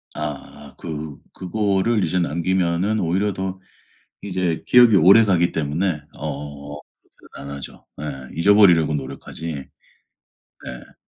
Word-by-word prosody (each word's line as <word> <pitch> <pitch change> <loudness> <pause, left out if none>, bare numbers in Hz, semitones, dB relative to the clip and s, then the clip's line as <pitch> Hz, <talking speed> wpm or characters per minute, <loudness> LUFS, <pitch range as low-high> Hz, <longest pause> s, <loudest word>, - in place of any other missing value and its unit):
아. 75 -1 -7
그 75 -2 -6 0.2
그거를 100 +2 0
이제 90 +3 0
남기면은 90 +4 0
오히려 95 +4 0
더 95 0 -4 0.6
이제 90 -4 -2
기업이 120 -4 +6
오래가기 95 -1 +5
때문에 80 +2 -1 0.2
어 75 -1 -6 0.4
그렇게는 70 - -11
안 70 - -6
하죠. 70 - -11
네. - - -7 0.3
잊어버리려고 85 -4 +5
노력하지 75 +3 -7 1.2
네. 65 -2 -10
85 Hz, 255 characters per minute, -21 LUFS, 75-95 Hz, 1.2 s, 기업이